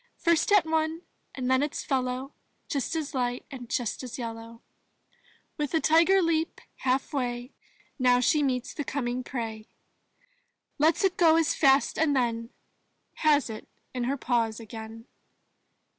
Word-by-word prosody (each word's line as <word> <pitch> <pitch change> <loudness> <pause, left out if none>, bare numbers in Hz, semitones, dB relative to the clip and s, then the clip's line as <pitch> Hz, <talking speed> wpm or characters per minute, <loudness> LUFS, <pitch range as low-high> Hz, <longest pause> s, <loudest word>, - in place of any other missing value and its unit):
First 335 +3 +2
at 410 -4 +6
one 320 +1 -1 0.3
and 255 -2 -3
then 260 +1 +3
its 295 0 -2
fellow 260 +1 -2 0.3
Just 280 +3 -2
as 315 -1 -3
light 245 -2 -1
and 250 -3 -8
just 240 -4 -2
as 255 -3 -7
yellow. 230 -2 -5
• 225 - -10
• - - -12
• - - -20 1.0
With 300 +2 -2
a - - +4
tiger 335 +5 +4
leap 325 -1 0 0.2
half 265 +3 0
way 245 -1 -2 0.5
Now 250 -1 +4
she 295 +4 +3
meets 255 -3 -1
the 295 - -3
coming 255 -2 -2
prey, 225 -4 -5 1.1
Lets 315 +5 +3
it 380 -2 +2
go 325 -2 +6
as 325 -3 +3
fast, 270 -1 +3
and 305 -3 +3
then 230 -2 0 0.7
Has 295 -4 +3
it 220 -2 -8 0.3
in 250 -2 -2
her 275 +3 -1
paws 230 -4 0
again. 225 0 -9
260 Hz, 160 wpm, -27 LUFS, 240-310 Hz, 1.1 s, at